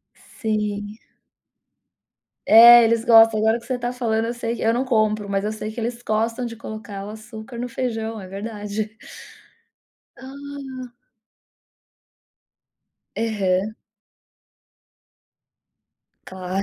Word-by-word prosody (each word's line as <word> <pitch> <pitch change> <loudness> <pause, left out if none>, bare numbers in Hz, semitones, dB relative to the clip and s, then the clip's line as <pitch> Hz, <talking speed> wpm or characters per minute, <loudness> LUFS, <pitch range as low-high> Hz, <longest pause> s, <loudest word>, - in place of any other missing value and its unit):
Sim. 210 -1 -4 1.5
É. 235 +2 +9
Eles 230 0 +1
gostam. 225 -2 +6
Agora, 220 +2 +2
que 230 - -16
você 255 -2 -2
tá 245 0 -3
falando, 225 -3 -1
eu 235 - -3
sei 235 0 -3
que - - -7
eu 225 - +3
não 255 - 0
compro, 215 -4 0
mas 195 0 -1
eu 210 - -1
sei 215 0 -5
que 235 - -6
eles 235 +1 -4
gostam 230 +2 -1
de 230 -1 -7
colocar 210 -3 -8
o - - -7
açúcar 220 +2 -10
no 245 +1 -3
feijão. 225 -3 -4
É 190 - -9
verdade. 210 +1 -5 1.2
Ah. 270 -2 -9 2.2
Aham. 210 -2 0 2.5
Claro. 185 +1 -4
225 Hz, 115 wpm, -22 LUFS, 215-235 Hz, 2.5 s, É